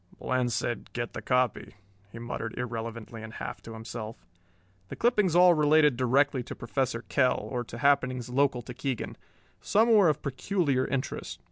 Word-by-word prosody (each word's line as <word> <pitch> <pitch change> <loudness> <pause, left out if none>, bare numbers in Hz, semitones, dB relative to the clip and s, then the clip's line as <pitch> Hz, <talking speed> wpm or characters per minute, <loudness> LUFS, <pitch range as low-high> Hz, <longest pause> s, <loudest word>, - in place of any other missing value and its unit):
"Bland 125 -1 0
said, 120 +1 -2
'Get 120 -1 -4
the - - -5
copy'," 125 -4 0 0.4
he 115 - -10
muttered 115 -1 -5
irrelevantly 115 -1 -5
and 110 0 -9
half - - -6
to 115 - -9
himself. 110 0 -7 0.6
The - - -7
clippings 210 -8 +2
all 180 0 +7
related 150 -2 +4
directly 130 +2 +2
to - - -8
Professor 120 -1 -2
Kell 130 -3 +2
or 125 -2 -2
to 120 - -9
happenings 130 -2 +2
local 130 -1 +1
to 125 - -8
Keegan. 130 -1 -4 0.5
Some 225 +3 +3
were 200 -6 +6
of 150 0 -1
peculiar 140 -1 0
interest. 135 0 -4
125 Hz, 160 wpm, -28 LUFS, 120-145 Hz, 0.6 s, all